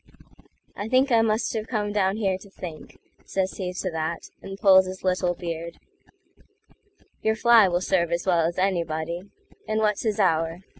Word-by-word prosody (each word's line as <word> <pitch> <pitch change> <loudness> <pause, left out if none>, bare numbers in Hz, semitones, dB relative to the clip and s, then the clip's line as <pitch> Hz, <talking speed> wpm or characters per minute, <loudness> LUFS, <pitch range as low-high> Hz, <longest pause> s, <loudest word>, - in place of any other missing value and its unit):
"I 205 +2 -5
think 260 +2 +3
I 230 -1 +5
must 220 0 0
have 220 -1 -3
come 210 -3 -2
down 195 -1 +1
here 195 -4 0
to 200 - -15
think,"Says 185 +2 -6
he 185 -2 -3
to 185 0 -4
that, 160 +1 -4
and 195 0 -8
pulls 190 -2 +6
his 185 0 -8
little 180 -1 0
beard;"Your 220 - -8
fly 230 -2 +6
will 175 0 0
serve 175 -3 +1
as 170 +1 -1
well 170 -3 +3
as 170 - -5
anybody, 170 -3 -1 0.5
And 215 - -1
what's 210 -2 +1
his 215 -2 -1
hour? 165 -2 +1
190 Hz, 160 wpm, -25 LUFS, 170-215 Hz, 0.5 s, pulls